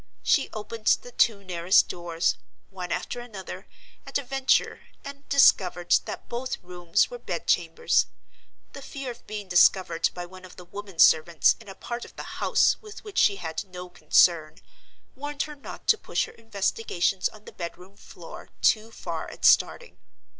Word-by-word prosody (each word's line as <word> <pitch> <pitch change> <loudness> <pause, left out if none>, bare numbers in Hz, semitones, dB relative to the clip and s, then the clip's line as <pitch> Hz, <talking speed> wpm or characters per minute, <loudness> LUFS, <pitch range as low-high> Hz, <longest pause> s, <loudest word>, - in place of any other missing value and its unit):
She - - +2
opened 215 +1 -7 0.2
the 245 - -11
two 220 -4 +2
nearest 180 0 +3
doors, 170 -1 -1 0.4
one 180 -2 -6
after 245 - -3
another, 215 -6 -9 0.4
at - - -2
a 280 - -4
venture, 270 +1 +1 0.3
and 280 0 -10
discovered 185 -10 +4
that - - -7
both 245 +2 -4
rooms 175 - 0
were - - -7
bed - - -5
chambers. 470 0 +2 0.7
The 275 - -9
fear 275 -1 -6
of 235 - -15
being 210 -2 -6
discovered 175 -2 +4
by 175 -1 -5
one 185 +1 -13
of 185 - -13
the 180 - -12
woman 200 0 -9
servants 160 -1 +5
in 225 - -16
a 195 - -9
part 235 +4 -6
of - - -13
the - - -7 0.2
house - - +3
with 425 -1 -11
which 415 -2 -3
she 200 - +4
had 160 -4 -4
no 180 -1 -9
concern, 165 -3 +3 0.6
warned 290 +1 -3
her 300 -1 -8
not 280 - -10
to 445 - +5
push - - -1
her - - -12
investigations 200 -3 -1
on 215 0 -17
the - - -10
bedroom 180 +3 -8
floor - - -12
too 220 0 +3
far 230 - -6
at - - -5
starting. 485 - +3
200 Hz, 170 wpm, -26 LUFS, 180-245 Hz, 0.7 s, servants